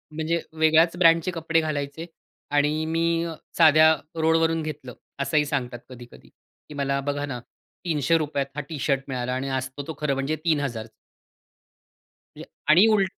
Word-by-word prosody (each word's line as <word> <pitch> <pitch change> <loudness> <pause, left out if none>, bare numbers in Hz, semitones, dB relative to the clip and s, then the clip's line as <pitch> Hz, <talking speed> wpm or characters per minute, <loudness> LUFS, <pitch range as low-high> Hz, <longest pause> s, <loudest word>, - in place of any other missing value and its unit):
म्हणजे 160 +2 -1 0.2
वेगळ्याच 160 +2 +4
ब्रँडचे 165 0 +4
कपडे 165 -1 0
घालायचे 150 0 -4 0.5
आणि 150 +2 +1
मी 165 +1 0 0.3
साध्या 155 -1 +6 0.3
रोडवरून 165 0 +2
घेतलं 150 -5 -7 0.3
असंही 150 +2 +1
सांगतात 125 -4 -3
कधी-कधी 120 -1 -13
की - - -19
मला 140 -1 -1
बघा 145 +1 -2
ना, 130 -4 -5 0.5
₹300 150 -2 +1
त - - -13
हा 150 - -2
टी-शर्ट 140 -3 -1
मिळाला 125 -2 -3
आणि 130 +2 -3
असतो 130 +1 -4
तो 160 - -4
खरं 150 -2 0
म्हणजे 135 +3 -1
3,000. 140 -9 0 1.5
ये - - -9 0.3
आणि 180 +7 +7
उल 205 -2 +4
150 Hz, 140 wpm, -24 LUFS, 140-165 Hz, 1.5 s, आणि